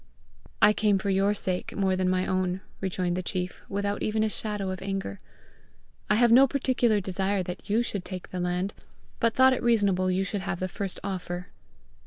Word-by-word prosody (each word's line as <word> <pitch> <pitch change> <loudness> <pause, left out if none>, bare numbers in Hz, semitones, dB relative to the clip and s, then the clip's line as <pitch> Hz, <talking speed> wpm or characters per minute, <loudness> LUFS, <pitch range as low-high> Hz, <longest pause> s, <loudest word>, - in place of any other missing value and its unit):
"I 210 - +8
came 210 -2 +2
for 195 +1 -1
your 195 +2 +2
sake 185 -2 -3
more 190 -2 +1
than 185 0 +1
my 185 0 +1
own," 185 0 -1 0.2
rejoined 180 -2 -1
the 185 - -1
chief, 180 0 -4
without 200 +1 -2
even 215 0 +1
a 220 - +1
shadow 210 -3 -3
of 185 0 -6
anger. 195 - -4 0.9
"I 210 - +4
have 235 +1 +4
no 265 +3 +8
particular 250 -5 +2
desire 190 +1 -1 0.2
you 220 +4 +2
should 200 -5 -4
take 185 -1 -7
the 185 - -4
land, 180 +2 -1 0.5
but 230 0 +2
thought 260 0 +6
it 255 - -2
reasonable 200 -6 +2
you 185 +1 +1
should 200 0 -3
have 190 -2 -3
the 185 - -1
first 195 +1 -4
offer." 180 -2 -4
195 Hz, 190 wpm, -27 LUFS, 185-210 Hz, 0.9 s, I